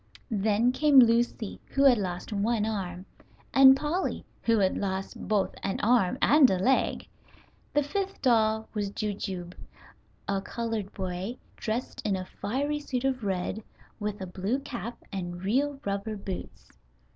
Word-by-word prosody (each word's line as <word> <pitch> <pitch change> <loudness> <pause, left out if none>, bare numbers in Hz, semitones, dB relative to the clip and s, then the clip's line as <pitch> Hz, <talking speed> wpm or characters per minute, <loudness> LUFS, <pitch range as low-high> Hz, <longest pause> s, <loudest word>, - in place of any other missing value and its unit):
Then 215 +3 +2
came 290 +1 +4
Lucy, 235 -3 +4
who 275 - +1
had 255 -5 +6
lost 180 +1 -4
one 210 +2 +1
arm, 190 -4 -4 0.5
and 265 0 +8
Polly, 305 +7 -2 0.2
who 230 -1 +3
had 190 -2 +2
lost 190 -1 -3
both 205 -1 +1
an 195 - -2
arm 230 -1 +3
and 290 -3 +7
a 190 - +1
leg. 255 +9 +1 0.6
The 295 0 +2
fifth 390 +7 -3
doll 220 -3 +2
was 205 -2 -1
Jujube, 195 -4 -4 0.7
a 195 -1 0
colored 225 -1 -3
boy, 190 +5 -4 0.2
dressed 230 +3 -3
in 205 -2 +1
a 185 -1 -4
fiery 285 +11 -2
suit 265 -4 -3
of 260 -3 0
red, 195 +2 -2 0.4
with 210 -1 -3
a - - -3
blue 190 +7 -2
cap 240 -3 -6 0.2
and 175 -2 -5
real 275 +7 +1
rubber 200 +2 -2
boots. 195 -2 -7
215 Hz, 145 wpm, -28 LUFS, 195-255 Hz, 0.7 s, and